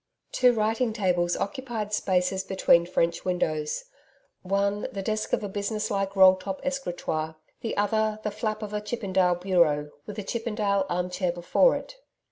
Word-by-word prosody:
Two 250 -1 +5
writing 225 +1 0
tables 180 -5 +1
occupied 220 -1 -4
spaces 190 -1 +1
between 180 -3 +3
French 170 -1 0
windows 155 - -1 0.6
one 200 +2 0
the 195 -1 -5
desk 215 +1 -2
of - - +1
a - - -2
business 205 +2 -3
like 195 -1 -1
roll 190 -1 +8
top 190 +1 -5
escritoire; 175 - -2 0.2
the 225 - -4
other, 215 +1 +1
the 210 - -1
flap 215 +1 -3
of 210 0 -6
a 210 - -1
Chippendale 195 -5 +1
bureau, 170 -5 +2 0.2
with 210 - -7
a 210 - -3
Chippendale 210 -3 -1
arm 180 +1 -1
chair 180 -1 0
before 175 - +3
it. - - -7
200 Hz, 160 wpm, -26 LUFS, 180-215 Hz, 0.6 s, roll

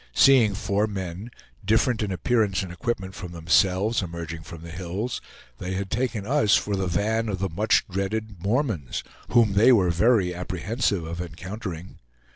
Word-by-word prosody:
Seeing 120 -7 +6
four 100 0 0
men, 95 +1 -5 0.3
different 110 +3 +2
in 105 -2 -1
appearance 95 +2 +1
and 90 - -7
equipment 95 +1 -3
from 90 -1 -8
themselves, 95 +6 +2
emerging 85 -2 -6
from 80 +1 -10
the 85 - -8
hills, 95 +7 -4 0.4
they 95 +1 -3
had 95 0 -4
taken 115 -4 -1
us 125 -4 +3
for 105 - 0
the 95 -1 -1
van 110 +6 0
of 100 - -2
the 95 +1 -2
much 105 +7 +2
dreaded 100 +1 -3
Mormons, 100 - -1 0.3
whom 115 -4 +4
they 110 +6 +6
were 95 -8 +4
very 95 0 +3
apprehensive 90 +2 -2
of 85 +2 -5
encountering. 90 +1 -7
95 Hz, 160 wpm, -25 LUFS, 90-110 Hz, 0.4 s, Seeing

